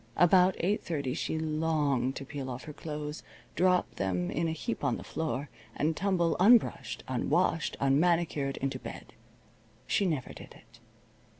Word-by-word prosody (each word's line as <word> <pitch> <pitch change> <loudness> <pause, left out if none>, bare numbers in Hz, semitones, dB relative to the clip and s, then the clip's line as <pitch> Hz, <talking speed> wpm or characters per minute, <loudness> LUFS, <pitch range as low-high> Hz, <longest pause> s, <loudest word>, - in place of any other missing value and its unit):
About 180 +1 +5
eight 200 +5 0
thirty 140 -7 -2
she 160 - -2
longed 155 -5 0
to 135 - -6
peel 135 -1 -6
off 125 +1 -6
her 150 - -8
clothes, 150 0 -6 0.3
drop 180 -9 +2
them 90 -2 -1
in 165 +3 0
a - - -1
heap 195 +9 -4
on - - +1
the - - -9
floor, 150 -3 -3 0.3
and 155 +2 0
tumble, 180 -3 +1
unbrushed, 230 +6 +4
unwashed, 165 - 0
unmanicured, 145 0 +2
into 135 -1 -2
bed. 115 -2 -9 0.7
She 200 - +1
never 150 -7 -2
did - - -12
it. - - -19
155 Hz, 155 wpm, -30 LUFS, 135-175 Hz, 0.7 s, About